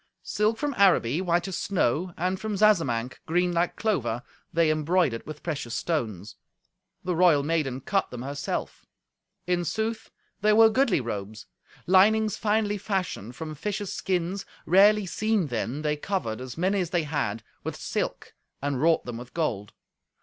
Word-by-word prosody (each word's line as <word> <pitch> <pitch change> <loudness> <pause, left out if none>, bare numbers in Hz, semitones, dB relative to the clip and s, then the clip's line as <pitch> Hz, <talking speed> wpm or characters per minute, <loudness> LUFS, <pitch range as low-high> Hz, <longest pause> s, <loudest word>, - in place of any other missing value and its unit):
Silk 215 +2 0
from 290 +2 -2
Araby, 180 -6 +4
white 175 -1 +1
as 190 - -3
snow, 180 -2 0
and 185 +2 -1
from 215 -1 -3
Zazamanc, 160 - +2
green 175 +2 +2
like 170 +1 +1
clover, 120 - -1 0.3
they 165 -1 +3
embroidered 155 -5 +1
with 155 -1 -8
precious 145 -8 -3
stones. 110 - -3 0.7
The 180 -1 -1
royal 165 -5 +5
maiden 145 -4 -1
cut 195 +8 0
them 125 0 -7
herself. 140 +1 -4 0.6
In 180 -1 +1
sooth, 220 +5 -2 0.3
they 210 +1 +4
were 225 +1 +7
goodly 245 - +2
robes. 105 -2 -5 0.4
Linings 210 +3 +4
finely 210 -1 0
fashioned 180 - -3
from 155 +2 -6
fishes' 205 +6 -3
skins, 185 +1 -1 0.2
rarely 200 +4 +5
seen 215 +1 0
then, 125 +2 -3
they 150 0 0
covered, 145 - -3
as 130 -2 -7
many 190 +3 +1
as 175 - -2
they 175 -3 +1
had, 140 -8 -2 0.2
with - - -4
silk, - - -4 0.3
and 140 -2 -2
wrought 165 +1 +3
them 120 -1 -5
with 125 0 -11
gold. 115 -12 -2
170 Hz, 155 wpm, -26 LUFS, 135-200 Hz, 0.7 s, were